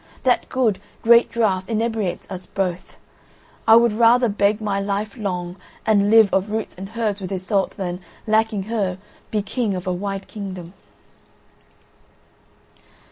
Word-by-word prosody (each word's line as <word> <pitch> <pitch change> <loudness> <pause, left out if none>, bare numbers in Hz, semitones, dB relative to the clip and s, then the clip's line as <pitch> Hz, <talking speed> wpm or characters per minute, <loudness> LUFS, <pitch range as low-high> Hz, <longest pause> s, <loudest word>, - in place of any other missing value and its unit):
That 250 -2 +2
good, 220 -7 +1 0.2
great 235 +1 +6
draught 195 -5 0
inebriates 220 -4 -1
us 185 -1 -7
both. 180 -2 -3 0.7
I 220 - +9
would 235 -1 +5
rather 235 +2 +4
beg 205 +1 +1
my 205 -2 -1
life 200 +1 -2
long 180 -4 -4 0.3
and 205 -2 +3
live 220 -2 +6
of 190 +2 +1
roots 220 0 -3
and 195 +2 -8
herbs 210 -3 -1
with 185 - -5
Iseult 190 +1 -1
than, 180 -1 -4 0.2
lacking 220 -2 +1
her, 200 -4 -2 0.3
be 210 -2 -1
king 210 0 -1
of 180 - -5
a 185 - 0
wide 195 +1 -4
kingdom." 185 -4 -7
205 Hz, 140 wpm, -22 LUFS, 190-220 Hz, 0.7 s, I